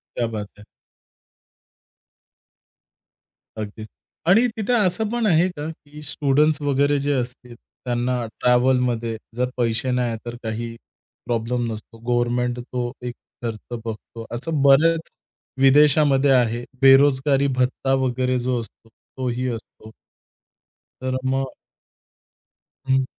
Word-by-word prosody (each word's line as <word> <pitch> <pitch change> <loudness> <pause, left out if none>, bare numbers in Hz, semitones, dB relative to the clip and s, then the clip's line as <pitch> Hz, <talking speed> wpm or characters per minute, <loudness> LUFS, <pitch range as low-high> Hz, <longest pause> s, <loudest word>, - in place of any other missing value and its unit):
क्या 120 - 0
बात 105 -2 -5
है. 105 - -14 2.9
अगदीच 110 0 -6 0.4
आणि 220 +8 +6
तिथे 220 +3 0
असं 210 -1 +2
पण 240 0 -1
आहे 175 -3 +4
का? 150 -4 -6
की 150 -2 -12
स्टुडंट्स 145 +2 +2
वगैरे 145 0 +2
जे 145 +1 0
असतील, 125 -1 -4
त्यांना 120 0 -3
ट्रॅव्हलमध्ये 125 -2 +2 0.2
जर 125 +1 0
पैसे 120 +1 0
नाही 125 -1 +1
आहेत, 115 -1 -4
तर 120 0 -5
काही 115 +1 -4 0.5
प्रॉब्लेम 120 0 -1
नसतो? 110 +1 -9
गव्हर्नमेंट 120 +1 0
तो 120 0 -4
एक 125 -1 -4 0.3
खर्च 115 +1 -5
बघतो. 115 +1 -7
असं 145 +4 -2
बऱ्याच 160 +4 +4 0.5
विदेशामध्ये 140 0 +5
आहे. 120 -2 +2 0.2
बेरोजगारी 135 +1 +5
भत्ता 130 0 0
वगैरे 130 0 0
जो 125 0 0
असतो, 115 0 -15
तो 130 +3 -8
ही 125 +2 -2
असतो. 110 -1 -8 1.1
तर 130 0 -1
मग 135 0 -1 1.3
हं. 130 0 +3
125 Hz, 115 wpm, -22 LUFS, 120-140 Hz, 2.9 s, आणि